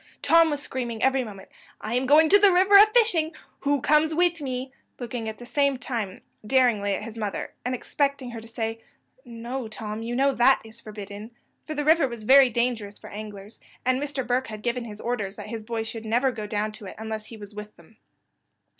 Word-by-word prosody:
Tom 330 0 +5
was 290 -1 -3
screaming 240 -5 -4
every 265 0 +3
moment, 200 -4 -10 0.3
"I 215 - -5
am 255 +2 0
going 310 +3 +6
to 405 - +7
the 405 -1 +6
river 375 +3 +3
a 405 +2 +10
fishing 425 -8 +2 0.3
who 285 -1 0
comes 305 +3 +3
with 345 -1 +2
me?" 260 -1 -4 0.2
looking 235 -2 -4
at 215 - -8
the 240 - -10
same 280 +1 +1
time 225 -7 -4 0.2
daringly 215 -4 +2
at - - -5
his 225 0 -8
mother, 210 -2 -4
and 250 +1 -1
expecting 280 0 -2
her 230 -1 -7
to 225 - -12
say, 225 0 -4 0.4
"No, 235 +2 -5
Tom; 215 0 -6
you 235 +1 -4
know 275 +2 +3
that 255 +2 +5
is 220 +1 -13
forbidden;" 210 0 -8 0.4
for 310 - -5
the 295 0 -2
river 315 -2 +5
was 235 -3 -8
very 265 +3 +7
dangerous 230 -3 -2
for - - -12
anglers, 205 0 -9 0.3
and 255 +1 +2
Mr. 280 -3 -3
Burke 250 +2 0
had 215 -1 -8
given 240 0 -1
his 210 -2 -9
orders 215 -5 -3
that - - -8
his 225 -2 -5
boys 225 0 -3
should 225 0 -7
never 245 +4 +2
go 215 -3 -6
down 210 0 -1
to 210 -1 -10
it - - -9
unless 220 -1 -5
he 230 - -10
was 205 0 -11
with 210 0 -9
them. 170 +6 -21
240 Hz, 215 wpm, -25 LUFS, 215-275 Hz, 0.4 s, a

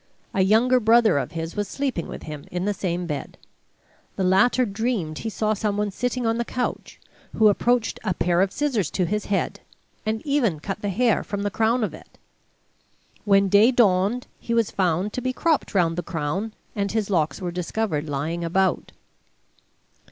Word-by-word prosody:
A 190 - +2
younger 230 +6 +4
brother 225 -7 +4
of 130 - -5
his 165 0 -5
was 205 -1 -1
sleeping 265 -8 -2
with - - -8
him 150 -2 -7
in 180 +1 -3
the 205 - +1
same 180 -2 -2
bed. 150 -4 -5 0.8
The 190 - -1
latter 235 +7 +4
dreamed 200 -7 -2
he 225 - -3
saw 215 0 0
some 210 -1 -1
one 210 -1 0
sitting 245 +4 -2
on 225 +1 +1
the - - +1
couch, 245 +1 -4 0.4
who 220 -1 +6
approached 240 +3 +1
a 190 -5 -1
pair 175 +1 +2
of 190 0 +2
scissors 245 - 0
to 185 - 0
his 210 +4 -2
head, 200 -2 -1 0.4
and 220 +2 -2
even 255 - +1
cut 195 +6 -5
the 205 - -2
hair 230 +3 +2
from 200 0 -4
the 205 - -1
crown 225 +4 +1
of 215 - -2
it. - - -14 1.1
When 195 -1 +4
day 205 +4 +6
dawned 215 0 +2
he 235 - -2
was 230 -3 +2
found 185 +2 0
to 250 - -3
be 255 +1 -1
cropped 315 -6 0
round 165 -3 +3
the - - 0
crown, 175 +7 -3 0.2
and 200 -2 -1
his 215 -2 -1
locks 160 -4 +1
were 180 -2 -3
discovered 175 -3 -2
lying 155 +5 -2
about. 190 +3 0
205 Hz, 185 wpm, -24 LUFS, 180-230 Hz, 1.1 s, who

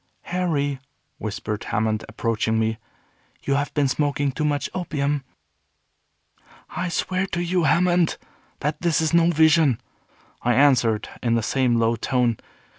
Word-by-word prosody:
"Harry," 150 -7 -1 0.4
whispered 105 0 -4
Hammond, 110 0 -1
approaching 110 0 -1
me, 110 0 0 0.6
"you 140 - 0
have 140 +1 0
been 145 -2 +3
smoking 145 0 0
too 140 - -3
much 145 -1 0
opium." 145 -5 -1 1.5
"I 180 - -3
swear 185 +3 -1
to 170 - -3
you, 175 -1 +1
Hammond, 175 +2 +3 0.4
that 150 +1 -2
this 170 -4 +2
is 160 0 0
no 170 0 +5
vision," 160 -5 +4 0.6
I 120 0 +2
answered, 125 -6 +3
in 115 -1 +1
the 115 - 0
same 125 0 +1
low 115 0 +2
tone. 120 -1 +1
140 Hz, 135 wpm, -23 LUFS, 115-160 Hz, 1.5 s, no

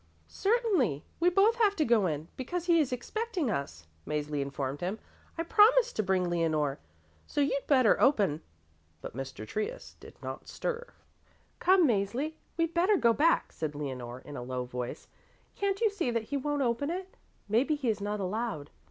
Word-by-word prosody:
"Certainly. 390 - +1
We 345 +1 +5
both 405 +6 +4
have 420 -4 +3
to 310 - +1
go 225 -5 +3
in, 155 -1 -3
because 340 +7 -4
he 340 -2 +4
is 290 -5 +1
expecting 355 - -2
us," 80 - -4 0.2
Mäzli 150 -1 -2
informed 140 0 -3
him. 185 +5 -2 0.4
"I 330 - 0
promised 455 +6 +5
to - - +2
bring 190 -2 +1
Leonore, 155 -5 0 0.5
so 295 - -3
you'd 280 -1 +1
better 260 -6 +4
open." 200 - +3 0.6
But - - -8
Mr. 135 -5 -6
Trius 215 - -4
did - - -13
not - - -6
stir. 485 0 -4 0.7
"Come, 365 -3 +5
Mäzli, 235 +8 0 0.2
we'd 330 0 0
better 370 +4 +3
go 235 -7 +4
back," 320 +7 +2
said 155 -2 -4
Leonore 130 -4 -5
in 145 - -10
a - - -5
low 125 0 -3
voice. 125 0 -6 0.5
"Can't 395 0 -1
you 445 -3 +3
see 375 -10 -1
that 230 -2 0
he - - +2
won't 290 +1 -1
open 240 +4 0
it? 370 +2 -5 0.3
Maybe 245 +9 +2
he 280 -4 -3
is 210 -2 -1
not 205 +1 -2
allowed." 195 -6 -3
235 Hz, 175 wpm, -30 LUFS, -, 0.7 s, We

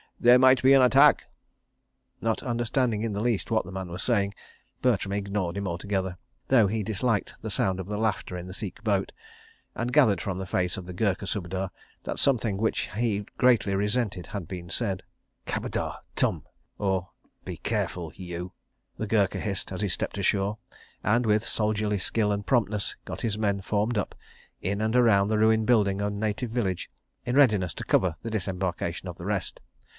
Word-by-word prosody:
There 120 +1 +7
might 130 -1 +6
be 130 +1 +6
an 135 - +7
attack... 125 - +6 0.5
." - - -47
Not 115 -1 0
understanding 120 -2 0
in 115 -2 -1
the 100 - -2
least 115 -3 0
what 110 -4 +1
the 95 - -8
man 95 -1 -5
was 85 +2 -5
saying, 100 -5 +1 0.5
Bertram 100 -6 +1
ignored 100 -3 -2
him 100 -1 -2
altogether, 95 +1 -2 0.3
though 120 -6 +5
he 110 +2 -1
disliked 110 +1 -1
the 110 - -4
sound 95 -1 0
of 95 - -5
the 105 0 -3
laughter 105 -4 -1
in 90 - -6
the 90 - -7
Sikh 105 +2 -6
boat, 100 -3 +1 0.6
and 120 +1 -2
gathered 130 -10 +5
from 95 -2 -3
the 95 - -3
face 90 -1 0
of 95 - -6
the 90 - -7
Gurkha 100 0 0
Subedar 95 0 -2 0.3
that - - -4
something 115 -7 +2
which 110 +2 0
he 105 -3 0
greatly 120 -6 +4
resented 105 -3 -1
had 100 -6 -5
been 85 -1 -7
said. 95 -4 -1 0.4
"Khabadar... - - -2 0.2
tum!" - - 0 0.3
the 95 -3 -4 1.5
Gurkha 100 -3 +2
hissed, 100 -3 -3
as 95 - -4
he 105 - 0
stepped 95 - -2
ashore, 100 +2 +1 0.5
and, 120 +3 +2
with 105 0 +3
soldierly 105 -2 0
skill 105 +2 0
and 100 0 -2
promptness, 105 -5 +1
got - - -6
his 110 -3 -1
men 100 -2 +1
formed 105 +4 0
up, 105 - -2 0.5
in 100 +3 -1
and 110 +2 0
around 110 -5 +5
the 110 0 +1
ruined 110 0 +4
building 100 -5 +3
and 100 0 -2
native 110 +3 -2
village, 100 -7 -1 0.3
in 120 - -2
readiness 105 - +4
to - - -5
cover 90 -4 +2
the 115 - -4
disembarkation 90 -3 -2
of 90 - -7
the 85 - -8
rest. 100 -2 -2
105 Hz, 175 wpm, -27 LUFS, 95-115 Hz, 1.5 s, There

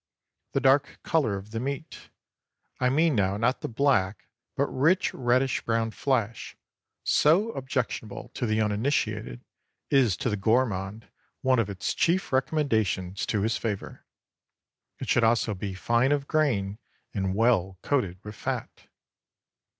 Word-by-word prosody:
The - - +2
dark 135 +2 +3
color 145 - +1
of 100 +2 -10
the 115 - -3
meat,—I 135 -1 -6
mean 155 +4 +3
now 100 -3 +1
not 120 +5 +1
the - - -3
black, 110 -7 +1 0.3
but - - +2
rich 160 +8 +2
reddish 130 +2 +1
brown 115 -1 0
flesh,—so 140 - 0
objectionable 125 - -4
to 120 - -3
the 110 0 +1
uninitiated, 105 - -1 0.5
is 125 -9 +4
to - - -1
the - - +1
gourmand 110 -1 0 0.3
one 130 -3 +3
of 110 -3 0
its 95 -1 -2
chief 175 -3 +1
recommendations 110 - 0
to 100 -2 0
his 110 0 +1
favor. 105 -4 -4 0.9
It - - -6
should 120 - +3
also 115 -1 +2
be 95 0 -5
fine 120 +7 +2
of 140 -1 0
grain 110 -11 0 0.3
and 95 -2 -1
well 100 -5 +2
coated 110 -11 0
with 105 - -7
fat. - - -5
115 Hz, 135 wpm, -27 LUFS, 100-135 Hz, 0.9 s, is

